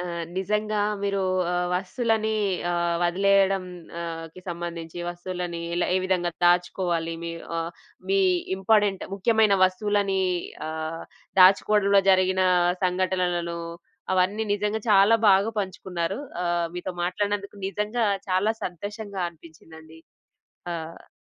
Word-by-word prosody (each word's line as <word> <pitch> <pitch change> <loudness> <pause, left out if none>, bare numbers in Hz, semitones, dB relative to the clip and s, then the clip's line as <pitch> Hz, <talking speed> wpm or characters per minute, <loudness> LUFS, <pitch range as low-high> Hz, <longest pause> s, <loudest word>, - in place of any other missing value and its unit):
ఆ! - - -3 0.3
నిజంగా 210 +2 0 0.2
మీరూ 200 -1 0 0.3
ఆహ్, 180 0 0
వస్తువులని 220 +4 0 0.4
ఆహ్, 170 0 0
వదిలెయడం 195 +1 +3 0.4
ఆహ్, 165 -1 -5
కి 185 - -11
సంబంధించి 170 -1 -6
వస్తువులని 175 -1 -5
ఎల 175 - +1
ఏ - - +4
విధంగా 180 -2 0
దాచుకోవాలి, 175 -1 +1
మీ 170 - -4 0.3
ఆహ్, 165 +1 -2 0.4
మీ 195 0 +3 0.4
ఇంపార్టెంట్, 205 0 +2
ముఖ్యమైన 215 0 +3
వస్తువులనీ 195 0 +1 0.5
ఆహ్, 160 +1 -4 0.4
దాచుకోడంలో 200 +1 +5
జరిగినా 185 0 +3 0.4
సంఘటనలను, 180 -2 0 0.6
అవన్నీ 190 +4 +1
నిజంగా 210 +2 -1
చాలా 200 +3 +6
బాగా 200 +3 +4
పంచుకున్నారు. 185 -1 -3 0.2
ఆహ్, 175 -1 0
మీతో 180 +1 -4
మాట్లాడినందుకు 200 +2 -2
నిజంగా 210 +4 -1 0.2
చాలా 190 +4 +2
సంతోషంగా 200 +2 -5
అనిపించిందండి. 160 -1 -15 0.7
ఆహ్ 165 0 -8
185 Hz, 105 wpm, -25 LUFS, 175-200 Hz, 0.7 s, చాలా